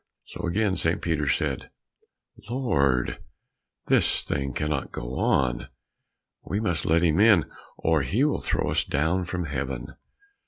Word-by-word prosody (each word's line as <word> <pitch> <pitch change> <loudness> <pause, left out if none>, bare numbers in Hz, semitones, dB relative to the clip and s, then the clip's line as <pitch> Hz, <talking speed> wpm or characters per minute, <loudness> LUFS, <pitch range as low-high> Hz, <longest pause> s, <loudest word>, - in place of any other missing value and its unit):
So - - -5
again 95 +2 +1
St. 80 +1 0
Peter 80 -3 -1
said, - - -1 0.8
"Lord, 70 - +1 0.7
this - - +3
thing 70 -1 -2
cannot 75 +1 -2
go - - -5
on, 65 -3 +1 0.7
we 100 - -3
must 85 -8 -1
let 85 +2 +3
him 80 0 +3
in, 105 -6 +6 0.3
or 80 -2 +2
he 100 - +1
will 150 - +1
throw - - -1
us - - +2
down 80 +5 0
from 90 +1 -3
Heaven." 65 -3 -4
80 Hz, 140 wpm, -26 LUFS, 70-95 Hz, 0.8 s, in